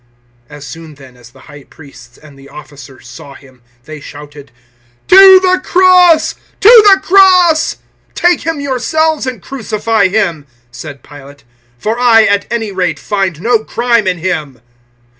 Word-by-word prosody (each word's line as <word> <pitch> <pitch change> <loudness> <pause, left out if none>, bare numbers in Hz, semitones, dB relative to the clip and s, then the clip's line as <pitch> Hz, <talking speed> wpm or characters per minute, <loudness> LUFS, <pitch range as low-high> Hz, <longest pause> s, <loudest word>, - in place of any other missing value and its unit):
019:006 150 - -13
As 145 - -13
soon 155 +3 -12
then 135 -3 -18
as 120 -1 -18
the - - -22
High 145 -2 -16
Priests 125 -6 -18
and 150 -2 -19
the 135 0 -17
officers 140 -3 -15
saw 135 +3 -14
Him, 130 -3 -20 0.2
they 155 +3 -12
shouted 145 -2 -14 0.6
"To 380 0 +7
the 370 0 -1
cross! 360 -3 +2 0.3
To 450 +1 +6
the 385 - +3
cross!" 365 -4 +2 0.4
"Take 350 0 0
him 325 -1 -5
yourselves 285 +2 -3
and 245 -7 -7
crucify 220 -4 -3
him," 180 -7 -3 0.2
said 140 +2 -12
Pilate; 140 -1 -16 0.3
"for 220 - -5
I, 230 -3 +3
at 205 -1 -1
any 225 -3 -5
rate, 180 -4 -3
find 195 -6 -4
no 230 +2 0
crime 235 -1 -2
in 180 -1 -2
him." 155 -8 -6
195 Hz, 155 wpm, -11 LUFS, -, 0.6 s, To